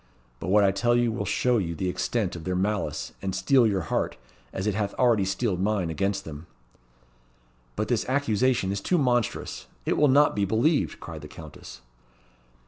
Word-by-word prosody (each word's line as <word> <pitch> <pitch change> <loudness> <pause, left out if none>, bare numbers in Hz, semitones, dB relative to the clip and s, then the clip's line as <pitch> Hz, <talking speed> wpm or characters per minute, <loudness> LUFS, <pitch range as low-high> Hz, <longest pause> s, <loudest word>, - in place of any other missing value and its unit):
But - - -6
what 105 +2 +5
I 100 - +4
tell 120 +5 +1
you 120 -1 +2
will 110 - -3
show 125 -2 +2
you 85 -4 -3
the 90 +4 -2
extent 95 +1 -1
of 85 - -8
their 90 +1 -2
malice, 100 +3 -2
and 95 -1 -3
steel 115 +6 +4
your 100 -3 0
heart, 85 - -2 0.3
as 95 - -4
it 105 - +1
hath 100 0 -2
already 115 -6 +3
steeled 95 0 -1
mine, 100 -4 0
against 100 +4 -1
them." 75 +1 -9 1.3
"But - - -2
this - - -1
accusation 130 -6 +1
is 100 0 -3
too 180 - +1
monstrous. 120 -6 -1 0.2
It - - 0
will 150 - +5
not 145 +2 +4
be 100 - +1
believed," 115 - +1
cried 80 -2 -8
the 75 - -9
Countess. 75 -6 -11
100 Hz, 185 wpm, -26 LUFS, 95-120 Hz, 1.3 s, what